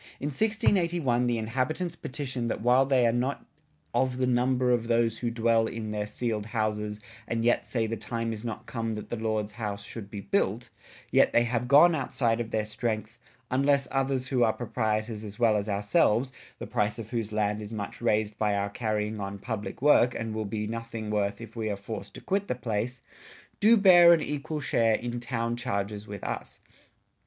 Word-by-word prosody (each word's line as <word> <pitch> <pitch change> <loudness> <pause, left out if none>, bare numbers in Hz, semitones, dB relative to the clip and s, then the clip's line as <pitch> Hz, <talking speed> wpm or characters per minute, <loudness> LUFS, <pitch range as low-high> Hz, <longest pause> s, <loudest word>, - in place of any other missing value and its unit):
In 145 - -2
1681 170 - +1
the 120 -1 +1
inhabitants 130 +10 -2
petitioned 130 -5 -4
that - - -3
while 125 +2 +4
they 130 -3 +4
are 115 - +4
not 125 +4 -1 0.5
"of 130 -1 +1
the 130 - +1
number 125 0 +2
of 120 -2 +1
those 115 -1 +2
who 120 - -1
dwell 115 -1 +2
in 110 -2 -5
their 105 -1 -2
ceiled 110 -2 -3
houses 105 -2 -2 0.2
& 110 - -23
yet 115 +1 +1
say 115 -3 0
the 115 +1 -2
time 115 +1 -3
is 110 0 -7
not 115 -3 -5
come 115 -2 -3
that 105 - -7
the - - -2
Lord's 110 -2 -2
house 105 -3 -5
should 105 -1 -8
be 100 -1 -6
built," 120 - 0 0.4
yet - - +4
they 120 - +5
have 120 0 -1
gone 150 +6 +7
outside 120 -5 0
of 115 - -5
their 110 -2 -1
strength 110 +1 -3 0.3
"unless 140 +1 +2
others 135 -1 0
who 130 -2 +1
are 110 -2 +4
proprietors 110 -2 -2
as 105 -1 -8
well 115 -3 +4
as 105 0 -1
ourselves, 105 +5 +2 0.3
(the - - -6
price 105 +2 -1
of 115 -1 -8
whose 115 -3 -2
lands 105 0 0
is 105 0 -7
much 105 -3 -5
raysed 110 -2 0
by 105 -2 +2
our 100 0 -1
carrying 105 -1 -2
on 100 0 -4
public 110 +4 -5
work 125 -4 +5
& 110 - -4
will 110 0 -2
be 105 +1 -3
nothing 115 -1 -5
worth 100 -1 0
if 115 0 -10
we 110 -2 -2
are 100 - -2
forced 100 +3 -7
to - - -9
quit 200 +1 -1
the - - -1
place) 120 +1 -3 0.6
doo 225 +3 +6
beare 175 -4 +8
an 160 - -2
equal 150 +1 -3
share 115 -5 +2
in 120 +1 -4
Town 120 -1 -2
charges 105 -4 -3
with 100 -1 -7
us. - - -5
115 Hz, 200 wpm, -28 LUFS, 105-125 Hz, 0.6 s, beare